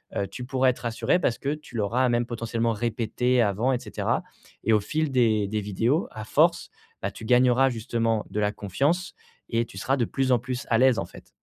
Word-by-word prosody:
heu, 100 Hz, -, 0 dB
tu 125 Hz, -, -8 dB
pourras 130 Hz, 0 st, +2 dB
être 125 Hz, -, -2 dB
rassurée 120 Hz, +9 st, 0 dB
parce 120 Hz, -, 0 dB
que 140 Hz, +1 st, -1 dB
tu 150 Hz, -5 st, -11 dB
l'auras 120 Hz, +5 st, +1 dB
même 120 Hz, 0 st, +1 dB
potentiellement 115 Hz, 0 st, -2 dB
répétée 120 Hz, +2 st, 0 dB
avant 110 Hz, +6 st, +1 dB
et 125 Hz, -, 0 dB
cetera. -, -, -2 dB, 0.4 s
Et 110 Hz, -, +3 dB
au 105 Hz, -, +5 dB
fil 150 Hz, +7 st, -2 dB
des 110 Hz, -5 st, +2 dB
des 105 Hz, +1 st, -2 dB
vidéos, 115 Hz, -, 0 dB
à 110 Hz, -, -7 dB
force, -, -, +2 dB, 0.3 s
bah, -, -, -1 dB
tu 110 Hz, -, -10 dB
gagneras 125 Hz, +2 st, +4 dB
justement 115 Hz, -2 st, -1 dB
de 105 Hz, -, -2 dB
la 105 Hz, 0 st, +1 dB
confiance 140 Hz, -, -1 dB, 0.4 s
et 115 Hz, 0 st, +1 dB
tu 95 Hz, -, -13 dB
seras 135 Hz, +8 st, 0 dB
de 120 Hz, -, +1 dB
plus 135 Hz, +2 st, -1 dB
en 125 Hz, -, +4 dB
plus 125 Hz, +1 st, -5 dB
à 115 Hz, -, +5 dB
l'aise, 130 Hz, -2 st, +5 dB
en -, -, -2 dB
fait. -, -, -15 dB
120 Hz, 215 wpm, -26 LUFS, 110-130 Hz, 0.4 s, au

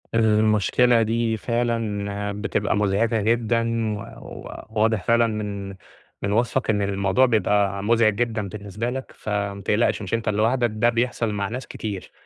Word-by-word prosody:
المشكلة 110 Hz, +2 st, +3 dB
دي 115 Hz, 0 st, 0 dB
فعلًا 105 Hz, -4 st, -2 dB
بتبقى 105 Hz, -2 st, 0 dB
مزعجة 105 Hz, +2 st, +1 dB
جدًا، 115 Hz, 0 st, +1 dB
و -, -, -7 dB
و -, -, -10 dB, 0.2 s
واضح 110 Hz, -3 st, +2 dB
فعلًا 115 Hz, 0 st, +3 dB
من 100 Hz, -3 st, -4 dB, 0.5 s
من 100 Hz, -, -1 dB
وصفك 120 Hz, +2 st, +1 dB
إن 105 Hz, -2 st, +2 dB
الموضوع 100 Hz, +5 st, +2 dB
بيبقى 100 Hz, -3 st, +1 dB
مزعج 110 Hz, -1 st, +3 dB
جدًا 110 Hz, -3 st, -1 dB
بالنسبة 105 Hz, +4 st, -4 dB
لك، 130 Hz, +1 st, -5 dB
فمّا 100 Hz, -1 st, -3 dB
تقلقش 110 Hz, +3 st, +1 dB
مش 100 Hz, 0 st, -6 dB
أنت 115 Hz, -1 st, 0 dB
لوحدك، 115 Hz, +4 st, +2 dB
ده 115 Hz, +2 st, +3 dB
بيحصل 115 Hz, -1 st, 0 dB
مع 100 Hz, -1 st, -2 dB
ناس 125 Hz, +4 st, -6 dB
كتير، 100 Hz, -4 st, -6 dB
110 Hz, 145 wpm, -23 LUFS, 100-115 Hz, 0.5 s, المشكلة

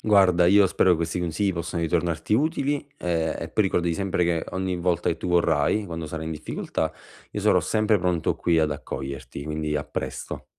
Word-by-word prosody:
Guarda, 95 Hz, -5 st, +4 dB
io 100 Hz, +2 st, +6 dB
spero 95 Hz, -, +3 dB
che 90 Hz, -, +5 dB
questi 85 Hz, +2 st, -2 dB
consigli 90 Hz, +3 st, 0 dB
possano 85 Hz, 0 st, -3 dB
ritornarti 85 Hz, +1 st, -1 dB
utili, 145 Hz, +2 st, +1 dB
e 85 Hz, -2 st, -1 dB
e -, -, -5 dB
poi 110 Hz, -, +1 dB
ricordati 85 Hz, -3 st, +1 dB
sempre 95 Hz, -1 st, 0 dB
che 85 Hz, -2 st, 0 dB
ogni 95 Hz, -1 st, -2 dB
volta 85 Hz, -1 st, 0 dB
che 85 Hz, -, 0 dB
tu -, -, -6 dB
vorrai, 85 Hz, +3 st, +2 dB
quando 80 Hz, -2 st, -5 dB
sarai 80 Hz, +1 st, -5 dB
in -, -, -3 dB
difficoltà, 80 Hz, 0 st, -3 dB, 0.4 s
io -, -, -3 dB
sarò -, -, +4 dB
sempre 110 Hz, 0 st, +2 dB
pronto 90 Hz, -2 st, 0 dB
qui 85 Hz, -2 st, +2 dB
ad 80 Hz, -1 st, +2 dB
accoglierti, 70 Hz, -2 st, -6 dB
quindi 75 Hz, 0 st, -2 dB
a 75 Hz, -, -2 dB
presto. -, -, -5 dB
85 Hz, 195 wpm, -25 LUFS, 80-95 Hz, 0.4 s, io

